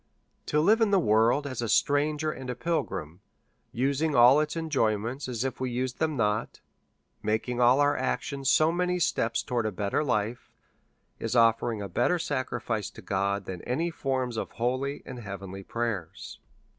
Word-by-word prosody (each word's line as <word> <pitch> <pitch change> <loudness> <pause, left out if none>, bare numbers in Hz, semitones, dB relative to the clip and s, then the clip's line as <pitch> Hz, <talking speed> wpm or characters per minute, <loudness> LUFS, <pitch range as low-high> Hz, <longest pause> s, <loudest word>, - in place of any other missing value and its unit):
To 150 - 0
hve 220 +6 +4
in 225 - +4
the 200 - +4
world 115 +1 +3
as 130 -4 -4
a 115 - -2
strang 145 +4 +2
er 155 - +1
and 130 -3 -8
a 125 - -2
pilg 165 +6 -1
rim, 80 +4 -7 0.5
using 140 +5 0
all 125 +4 +7
its 150 +1 -1
enjoy 145 -10 +1
ments 120 +7 -5
as 120 -2 -2
if 135 -2 -3
we 130 -1 -1
used 125 +1 -3
them 155 -2 0
not, 105 -1 -1 0.6
making 110 +3 -1
all 125 +3 +5
our 145 0 +3
actions 140 -2 -2
so 155 +3 +4
many 180 +1 0
steps 115 -9 0
towards 120 -3 -1
a - - -2
better 100 +8 -1
life, 115 -3 -1 0.7
is 115 +2 -2
offering 115 -2 +3
a - - -4
better 175 - +1
sacri 130 -5 -2
fice 110 -3 -2
to 110 - -13
God 100 +1 -1
than 90 -3 -6
any 165 +7 -1
forms 130 -6 -2
of - - -3
holy 130 +4 -2
and 125 -1 -8
heavenly 95 -3 -7
prayers. 110 -5 -4
125 Hz, 180 wpm, -28 LUFS, 110-145 Hz, 0.7 s, all